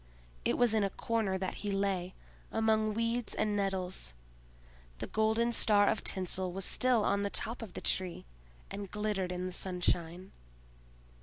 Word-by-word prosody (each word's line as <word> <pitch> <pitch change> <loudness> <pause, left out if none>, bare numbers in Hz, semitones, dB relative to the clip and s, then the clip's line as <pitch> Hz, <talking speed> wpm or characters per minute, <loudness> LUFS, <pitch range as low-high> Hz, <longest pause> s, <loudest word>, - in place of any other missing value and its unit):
It - - +1
was 240 -2 +4
in 215 -2 +3
a 200 - +1
corner 215 -2 -1
that 190 -1 -3
he 205 - -2
lay, 195 -2 -1 0.4
among 220 -1 +2
weeds 230 0 0
and 210 -1 +1
nettles. 185 - -1 0.8
The - - -4
golden 220 +2 +2
star 205 -3 +4
of - - +1
tinsel 185 0 0
was 190 +1 -3
still 250 -4 +3
on 200 0 +2
the 200 - 0
top 230 +4 -3
of 215 -5 -7
the - - -6
Tree, 185 -2 -2 0.5
and 200 -1 -5
glittered 210 -3 -1
in 180 0 -3
the 185 - -3
sunshine. 180 0 -1
200 Hz, 160 wpm, -32 LUFS, 185-220 Hz, 0.8 s, was